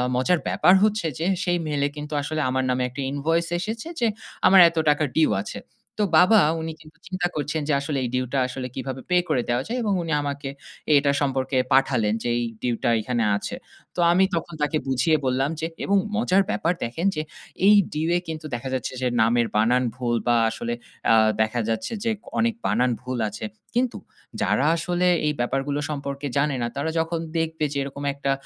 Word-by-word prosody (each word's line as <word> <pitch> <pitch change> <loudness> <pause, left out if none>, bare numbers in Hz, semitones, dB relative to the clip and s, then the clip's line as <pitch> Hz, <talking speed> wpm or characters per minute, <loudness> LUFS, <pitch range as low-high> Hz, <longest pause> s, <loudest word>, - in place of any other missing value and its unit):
মজার 155 +8 +2
ব্যাপার 180 - +4
হচ্ছে 215 -4 +1
যে, 165 - -1 0.2
সেই 175 -2 +1
mail 145 -2 -1
এ - - -5
কিন্তু 150 +1 -6
আসলে 155 +2 -2
আমার 130 +1 0
নামে 125 0 +1
একটা 130 +3 -6
invoice 165 +4 0
এসেছে 225 - -4
যে 235 - +3 0.4
আমার 190 0 +7
এত 165 - -13
টাকার 150 0 +2
due 160 - +4
আছে। - - -7 0.4
তো - - +4
বাবা 210 +5 +6 0.2
উনি 160 - -4
কিন্তু 155 0 -17
চিন্তা 185 -2 -1
করছেন 150 +1 -2
যে 150 - +3
আসলে 140 0 -2
এই 125 - -2
due 130 0 0
টা 135 - +2
আসলে 130 0 -5
কীভাবে 130 0 -5
pay 180 0 +4
করে 125 - +2
দেওয়া 120 +2 +1
যায় 245 - -2
এবং 210 -2 +1
উনি 165 - -4
আমাকে 140 -1 -4 0.5
এটা 140 0 +3
সম্পর্কে 135 -1 0 0.2
পাঠালেন 125 -6 +3
যে - - -1
এই - - -1 0.2
due 120 -2 0
টা - - +3
এখানে 120 0 -1
আছে। - - -5 0.4
তো - - -5
আমি 185 +2 +4
তখন 170 +1 -4
তাকে 150 +1 +1
বুঝিয়ে 135 +5 +2
বললাম 130 +2 +1
যে 160 - -2 0.2
এবং 200 - +3 0.2
মজার 200 -4 +3
ব্যাপার 170 -2 +1
দেখেন 160 +11 -1
যে, 155 - -1 0.5
এই 210 - +8 0.2
due 155 +2 -1
এ - - 0
কিন্তু 160 -1 -6
দেখা 120 +2 -5
যাচ্ছে 130 0 -3
যে 130 - +1
নামের 115 +1 +3
বানান 120 +4 +3
ভুল 120 -2 -1
বা 120 - +4
আসলে 115 +1 -4 0.4
আ - - +7 0.3
দেখা 110 +2 0
যাচ্ছে 115 - -2
যে 230 - +1 0.3
অনেক 230 0 +2
বানান 125 +4 +2
ভুল 125 0 -4
আছে 105 +1 -7 0.3
কিন্তু 250 0 +1 0.4
যারা - - +2
আসলে 175 +2 0 0.2
এই 150 - +1
ব্যাপারগুলো 135 +4 -1
সম্পর্কে 140 -1 -4
জানে 145 0 +1
না। 120 - 0
তারা 140 +3 -1
যখন 165 +1 -1 0.2
দেখবে 160 -1 -2
যে - - -3
এরকম 140 +1 -7
একটা 140 0 -2
145 Hz, 200 wpm, -24 LUFS, 130-165 Hz, 0.5 s, এই